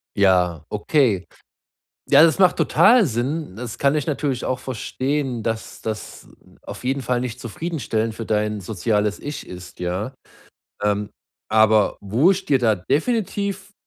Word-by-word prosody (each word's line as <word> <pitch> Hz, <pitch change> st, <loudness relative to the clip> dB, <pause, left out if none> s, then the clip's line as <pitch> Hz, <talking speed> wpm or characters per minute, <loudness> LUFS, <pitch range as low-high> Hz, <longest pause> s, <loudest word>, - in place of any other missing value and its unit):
Ja, 90 Hz, -5 st, +3 dB
okay. 105 Hz, -, +1 dB, 0.9 s
Ja, -, -, +8 dB
das 165 Hz, +2 st, +4 dB
macht 185 Hz, -2 st, +5 dB
total 235 Hz, -5 st, +5 dB
Sinn. 130 Hz, -, -3 dB
Das 120 Hz, -1 st, -6 dB
kann 140 Hz, +1 st, +2 dB
ich 150 Hz, -3 st, -1 dB
natürlich 140 Hz, -4 st, -2 dB
auch 130 Hz, -, -1 dB
verstehen, 130 Hz, 0 st, -3 dB
dass 115 Hz, 0 st, -4 dB
das 110 Hz, -1 st, -6 dB, 0.2 s
n -, -, -23 dB
auf -, -, -9 dB
jeden 135 Hz, +1 st, -1 dB
Fall 125 Hz, 0 st, 0 dB
nicht 125 Hz, -1 st, -4 dB
zufriedenstellend 115 Hz, -5 st, -3 dB
für 115 Hz, -, -6 dB
dein 105 Hz, -1 st, 0 dB
soziales 105 Hz, +1 st, -1 dB
Ich 145 Hz, +1 st, -6 dB
ist, 90 Hz, 0 st, -10 dB
ja. 95 Hz, +9 st, -3 dB, 0.7 s
Ähm, 105 Hz, 0 st, 0 dB, 0.4 s
aber 110 Hz, -1 st, +4 dB
wo 120 Hz, -, +3 dB
ich 195 Hz, 0 st, -2 dB
dir 135 Hz, -3 st, +3 dB
da 110 Hz, -3 st, +3 dB
definitiv 200 Hz, -, -1 dB
120 Hz, 145 wpm, -22 LUFS, 105-145 Hz, 0.9 s, Ja